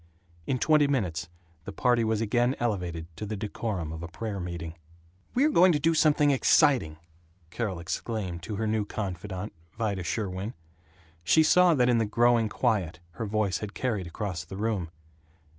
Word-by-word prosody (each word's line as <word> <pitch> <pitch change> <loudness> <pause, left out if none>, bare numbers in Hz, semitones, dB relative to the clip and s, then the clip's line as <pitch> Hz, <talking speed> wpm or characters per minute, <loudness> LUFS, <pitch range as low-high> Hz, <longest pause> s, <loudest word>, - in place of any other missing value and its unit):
In 130 - +1
twenty 150 +2 +4
minutes 90 - -1 0.4
the - - -5
party 120 +3 +2
was 110 -1 0
again 120 +4 +1
elevated 90 -8 -2
to - - -6
the 110 - -3
decorum 100 -5 -3
of 80 - -7
a 85 - -5
prayer 100 +3 -5
meeting. 85 -2 -5 0.6
"We're 290 +5 +4
going 180 - +6
to 150 - +1
do 165 +3 +2
something 150 -2 +4
exciting," 130 - +3 0.5
Carol 100 -6 -3
exclaimed 90 0 -4
to 105 +4 -5
her 110 +2 -2
new 110 0 +1
confidante, 100 -1 -5 0.2
Vida 105 -5 -1
Sherwin. 95 +3 -3 0.7
She 160 - +5
saw 180 +1 +5
that 125 -3 +3
in 120 -2 +3
the 110 - +1
growing 115 +1 +3
quiet 90 -7 0 0.2
her 115 - -2
voice 100 -4 0
had 105 -1 -7
carried 110 -8 -2
across 90 -1 -4
the 95 +4 -9
room. 105 -5 -1
105 Hz, 165 wpm, -28 LUFS, 90-120 Hz, 0.7 s, going